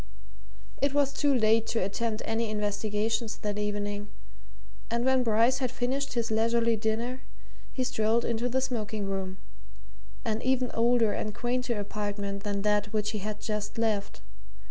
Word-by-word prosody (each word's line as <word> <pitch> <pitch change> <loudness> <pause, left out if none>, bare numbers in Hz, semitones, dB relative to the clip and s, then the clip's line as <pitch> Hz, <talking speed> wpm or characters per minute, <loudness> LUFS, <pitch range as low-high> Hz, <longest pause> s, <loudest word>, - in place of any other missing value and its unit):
It 280 0 +2
was 280 -1 +3
too 285 +1 +2
late 225 -3 +4
to 225 - 0
attempt 215 +3 -2
any 225 0 0
investigations 210 +2 -1
that 210 0 -3
evening, 205 0 -2 0.8
and 235 +1 0
when 260 -1 +4
Bryce 230 +2 +3
had 255 -2 0
finished 260 +3 -1
his 235 -2 -1
leisurely 230 +1 +3
dinner 230 +4 -1 0.5
he 260 - -1
strolled 235 -2 +1
into 235 +1 0
the 260 +2 +1
smoking 220 -5 -2
room 190 -1 -3 0.9
an 220 0 0
even 255 -1 +1
older 230 -1 +3
and 210 -1 -3
quainter 245 -1 -1
apartment 205 -1 -3
than 200 -1 -2
that 210 -1 +2
which 215 -1 0
he 215 - -3
had 210 +1 -4
just 210 0 -3
left. 215 - -1
225 Hz, 150 wpm, -29 LUFS, 210-245 Hz, 0.9 s, late